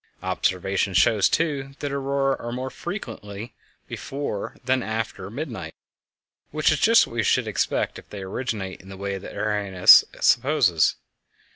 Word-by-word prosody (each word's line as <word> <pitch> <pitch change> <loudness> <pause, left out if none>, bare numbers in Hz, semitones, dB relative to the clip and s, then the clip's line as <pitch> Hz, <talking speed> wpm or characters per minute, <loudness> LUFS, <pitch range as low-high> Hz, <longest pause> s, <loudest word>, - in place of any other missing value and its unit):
Observation 95 +1 -1
shows, 100 +2 +4
too, 140 -4 -1
that 145 - -4
auroræ 140 0 0
are 120 - -5
more 130 +2 -4
frequent 170 - -6 0.7
before 135 -6 -5
than 130 0 +2
after 110 -4 -4
midnight, 130 +1 -6 0.7
which 155 +1 +2
is 155 - +1
just 230 +1 +6
what - - -12
we 120 - 0
should 105 - +1
expect - - -1
if - - -18
they 100 -2 -7
originate 95 -2 -4
in 95 - -15
the 95 - -9
way 100 0 -4
that 95 - -10
Arrhenius 100 -4 +6 0.2
supposes. - - +3
115 Hz, 145 wpm, -24 LUFS, 100-140 Hz, 0.7 s, just